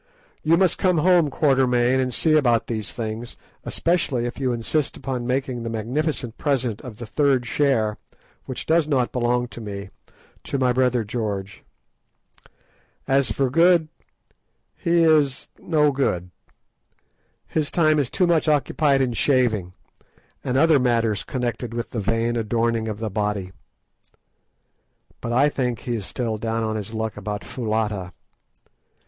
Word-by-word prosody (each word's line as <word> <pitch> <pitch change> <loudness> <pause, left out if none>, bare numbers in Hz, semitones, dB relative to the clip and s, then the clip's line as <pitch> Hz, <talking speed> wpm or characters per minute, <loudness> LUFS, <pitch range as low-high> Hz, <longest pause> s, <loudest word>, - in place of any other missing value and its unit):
You 165 +2 +3
must 185 -2 +2
come 185 -3 +2
home, 170 -1 +4
Quatermain, 130 -3 +2
and 130 -1 0
see 155 +5 +2
about 120 -7 +3
these 110 -3 -3
things, 115 +1 -5 0.3
especially 155 -8 0
if 120 - -5
you 130 -2 0
insist 120 +5 -1
upon 125 -2 -4
making 130 -1 -1
the 115 - -4
magnificent 120 +2 -2
present 130 -7 -1
of 120 -5 -9
the 120 - -7
third 135 0 +1
share, 115 -5 +1 0.5
which 130 - -6
does 160 -1 +3
not 130 -5 +1
belong 125 0 0
to 120 - -9
me, 100 -2 -7 0.5
to 140 - -2
my 130 -2 +2
brother 125 -2 +2
George. 100 -3 -4 1.4
As 135 -3 +2
for 130 +4 0
Good, 165 +1 +4 0.9
he 170 -2 +2
is 150 -4 +2
no 150 -3 +2
good. 90 -10 -1 1.1
His 155 -3 -1
time 155 -3 +3
is 135 -4 0
too 185 - +1
much 170 -2 +2
occupied 145 -2 +2
in 125 -2 -1
shaving, 110 -6 +1 0.7
and 125 - 0
other 160 0 +5
matters 115 -4 +1
connected 120 -2 -3
with 120 0 -4
the 115 - -2
vain 115 +3 0
adorning 115 0 0
of 105 -2 -3
the 110 -1 -4
body. 105 -2 -2 1.7
But 115 - -4
I 130 +5 +4
think 125 -5 -2
he 120 - -2
is 105 -4 -5
still 115 -3 -3
down 115 0 -1
on 110 0 -1
his 105 0 -5
luck 110 -1 -3
about 105 0 -4
Foulata. 105 -6 -2
125 Hz, 145 wpm, -23 LUFS, 110-140 Hz, 1.7 s, other